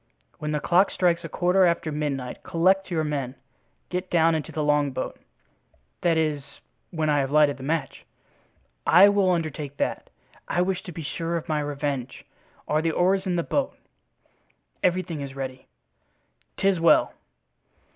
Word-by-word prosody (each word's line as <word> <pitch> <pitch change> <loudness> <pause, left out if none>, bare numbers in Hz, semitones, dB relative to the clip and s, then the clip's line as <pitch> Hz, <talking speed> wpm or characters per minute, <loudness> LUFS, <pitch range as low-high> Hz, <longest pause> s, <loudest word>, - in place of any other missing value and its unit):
When 150 0 -3
the 150 - 0
clock 180 +5 +3
strikes 175 -1 +1
a 165 - -6
quarter 180 +4 +2
after 170 -2 +1
midnight 140 -4 -3
collect 190 +3 +2
your 165 -3 0
men. 140 -4 -3 0.5
Get 180 +1 -3
down 165 -1 +3
into 155 -2 -3
the 155 - -2
longboat." 145 -3 0 0.8
"That 170 -2 +2
is, 155 -3 0 0.5
when 160 -2 -2
I 145 -1 +3
have 135 -1 0
lighted 150 -1 +4
the - - -12
match?" 145 0 -3 0.8
"I 190 +4 +8
will 200 -2 +2
undertake 155 -5 -2
that. - - -2 0.4
I 175 - +1
wish 185 0 -1
to 180 - -7
be 165 -1 -7
sure 165 +3 -2
of 165 - -6
my 155 -1 0
revenge. 145 -3 -4 0.4
Are 150 +1 +1
the 165 - 0
oars 190 +4 +1
in 180 - 0
the 170 - 0
boat?" 280 +8 -1 1.0
"Everything 180 -4 0
is 135 -1 -7
ready." 130 -1 -6 0.9
"'Tis 195 -2 +2
well." 165 - +4
160 Hz, 155 wpm, -25 LUFS, 145-180 Hz, 1.0 s, I